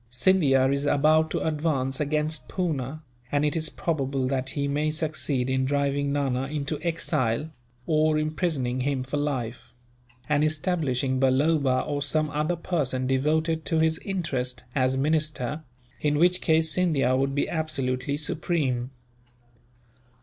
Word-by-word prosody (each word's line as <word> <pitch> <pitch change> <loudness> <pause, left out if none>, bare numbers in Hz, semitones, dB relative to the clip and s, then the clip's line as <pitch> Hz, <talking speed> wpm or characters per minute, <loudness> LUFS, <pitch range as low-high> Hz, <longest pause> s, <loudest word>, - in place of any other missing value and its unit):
Scindia 135 0 +3
is 140 +1 -1
about 155 +2 +4
to - - -2
advance 145 -4 -1
against 150 +1 -1
Poona, 155 -4 -2 0.3
and 145 +1 +2
it 150 - 0
is 155 -1 0
probable 135 -6 -1
that 130 0 -1
he 140 0 0
may 150 +2 0
succeed 155 -4 -1
in 130 0 +1
driving 140 +1 0
Nana 135 -2 0
into 145 +1 -3
exile, 155 -4 -1 0.3
or 155 -1 +2
imprisoning 155 -5 -1
him 135 -1 0
for 135 +3 -3
life; 125 -4 -3 0.5
and 150 0 +2
establishing 145 -5 0
Balloba, 135 0 +3
or 145 -1 -2
some 155 +1 0
other 150 +4 0
person 145 -7 -1
devoted 155 +5 +1
to 165 - +1
his 160 0 +2
interest, 135 -10 -3
as 130 -1 +1
minister, 150 -1 0 0.4
in 150 -1 +1
which 180 +3 +3
case 160 -1 +3
Scindia 155 -7 +2
would 135 +1 0
be 140 - +1
absolutely 140 -4 -1
supreme. 145 -5 -1
145 Hz, 135 wpm, -26 LUFS, 130-155 Hz, 0.5 s, about